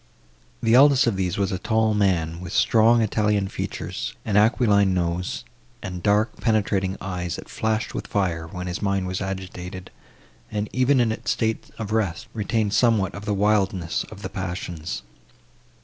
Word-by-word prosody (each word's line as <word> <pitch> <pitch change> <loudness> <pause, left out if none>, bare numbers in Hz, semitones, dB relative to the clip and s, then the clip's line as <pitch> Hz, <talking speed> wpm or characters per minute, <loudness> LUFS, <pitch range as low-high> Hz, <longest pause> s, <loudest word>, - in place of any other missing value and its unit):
The 115 0 +3
eldest 135 +1 +7
of 115 -4 +1
these 90 -2 -1
was 100 0 0
a 95 - -2
tall 110 +1 +2
man, 85 -5 +1
with 90 - -7
strong 115 +1 +4
Italian 105 -2 +1
features, - - -4
an 105 - -1
aquiline 105 -3 +4
nose, 90 +1 -2 0.4
and 90 -3 -5
dark 105 +3 +2
penetrating 100 -4 +1
eyes, 90 -3 -3
that - - -9
flashed 110 0 -1
with - - -4
fire, 85 -5 -1
when 90 +2 -6
his 90 -1 -4
mind 100 -2 0
was 90 +1 -3
agitated, 95 -1 -6 0.6
and, 105 0 -2
even 130 +2 +3
in 120 -2 +3
its 110 - -4
state 110 0 -1
of 110 -2 -5
rest, 100 -7 0
retained 110 -1 0
somewhat 110 -6 +3
of 100 - -8
the 105 -1 0
wildness 95 -4 +1
of 105 -2 -12
the 95 - -3
passions. 90 -6 -5
100 Hz, 165 wpm, -24 LUFS, 90-110 Hz, 0.6 s, eldest